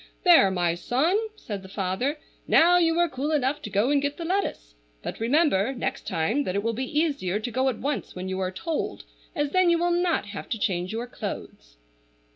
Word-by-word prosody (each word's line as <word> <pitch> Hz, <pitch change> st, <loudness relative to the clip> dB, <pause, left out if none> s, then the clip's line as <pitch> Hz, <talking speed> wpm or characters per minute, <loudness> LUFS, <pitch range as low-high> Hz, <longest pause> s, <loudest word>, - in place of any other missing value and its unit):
"There, 340 Hz, -, +7 dB
my 175 Hz, -3 st, +1 dB
son!" 260 Hz, -, +1 dB, 0.2 s
said 205 Hz, -, -6 dB
the 190 Hz, -, -12 dB
father. 195 Hz, +10 st, -1 dB, 0.3 s
"Now 355 Hz, +2 st, +6 dB
you 330 Hz, -1 st, +2 dB
are 345 Hz, 0 st, +4 dB
cool 280 Hz, 0 st, -3 dB
enough 290 Hz, 0 st, 0 dB
to 210 Hz, -, -6 dB
go 210 Hz, +7 st, +1 dB
and 285 Hz, -1 st, +3 dB
get 285 Hz, 0 st, -2 dB
the 335 Hz, -, -5 dB
lettuce; 345 Hz, -, -2 dB, 0.3 s
but -, -, -5 dB
remember 260 Hz, -, +2 dB
next 245 Hz, -, -3 dB
time 200 Hz, -, 0 dB
that 185 Hz, -, -2 dB
it 200 Hz, -, 0 dB
will 230 Hz, 0 st, 0 dB
be 260 Hz, +5 st, -1 dB
easier 275 Hz, -, 0 dB
to 240 Hz, +3 st, -4 dB
go 260 Hz, +3 st, +1 dB
at 245 Hz, -, -3 dB
once 285 Hz, +3 st, -3 dB
when 185 Hz, +1 st, -5 dB
you 190 Hz, 0 st, -3 dB
are 185 Hz, -1 st, 0 dB
told 320 Hz, -, -4 dB, 0.3 s
as 295 Hz, -3 st, -1 dB
then 370 Hz, -1 st, +4 dB
you 340 Hz, -, +4 dB
will 345 Hz, +1 st, +1 dB
not 345 Hz, -5 st, +1 dB
have 205 Hz, -1 st, -8 dB
to 230 Hz, -, -1 dB
change 185 Hz, -4 st, -1 dB
your 230 Hz, +2 st, -3 dB
clothes." -, -, -7 dB
255 Hz, 215 wpm, -26 LUFS, 195-315 Hz, 0.3 s, There